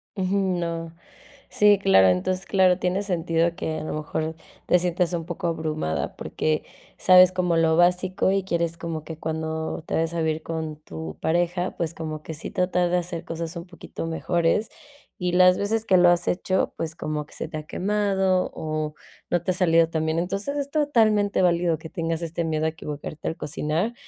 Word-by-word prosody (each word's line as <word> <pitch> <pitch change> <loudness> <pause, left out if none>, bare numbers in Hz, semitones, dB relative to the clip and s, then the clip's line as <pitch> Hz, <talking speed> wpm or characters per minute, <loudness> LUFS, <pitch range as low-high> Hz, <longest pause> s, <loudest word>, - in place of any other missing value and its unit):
Ujú, 190 0 0 0.2
no. 165 -1 -4 0.5
Sí, 205 -1 +5
claro. 195 - +5
Entonces, 185 - 0
claro, 185 -2 +4
tiene 185 +2 0
sentido 170 -3 0
que 155 0 -3
a - - -6
lo - - -4
mejor, 155 +1 -3 0.3
te 180 - +5
sientas 180 0 0
un 165 -1 -2
poco 175 0 -3
abrumada, 155 - -2
porque, 155 -1 -1 0.3
sabes 185 0 +7
como 180 -2 +1
lo 165 0 +3
básico, 180 +2 +3
y 195 -1 +1
quieres 170 -2 -1
como 165 -2 -5
que, 160 -1 -8
cuando 160 0 -3
te - - -1
vayas 165 +1 0
a 165 - -1
vivir 155 0 -1
con 160 -2 -4
tu 80 - -8
pareja, 175 +2 0
pues, 170 -1 -2
como 155 -1 -5
que, 160 - -7
sí 155 - -6
tratar 180 -1 +1
de 180 - +3
hacer 175 -1 -4
cosas 165 +1 -5
un 170 +1 -6
poquito 170 -2 -8
mejores. 170 +5 0 0.5
Y 180 -1 -1
las 180 0 +6
veces 220 +2 0
que 185 - +4
lo 175 0 +6
has 175 0 +2
hecho, 185 +1 0
pues, 165 0 -4
como 150 -2 -3
que - - -18
se - - -5
te 155 - -6
ha 155 - -5
quemado, 190 0 0
o 155 -1 -3 0.4
no 175 -1 +2
te 185 - -5
ha - - 0
salido 165 -2 +4
tan 160 -1 -1
bien. 160 +1 0
Entonces, 195 +10 -2
es 280 0 -2
totalmente 220 -10 +2
válido 170 -2 +2
que 160 - -9
tengas 165 -2 -2
este 170 +1 -3
miedo 155 -1 -1
a - - +2
equivocarte 150 -1 -7
al 160 - -2
cocinar. 155 +9 -2
170 Hz, 195 wpm, -24 LUFS, 160-185 Hz, 0.5 s, sabes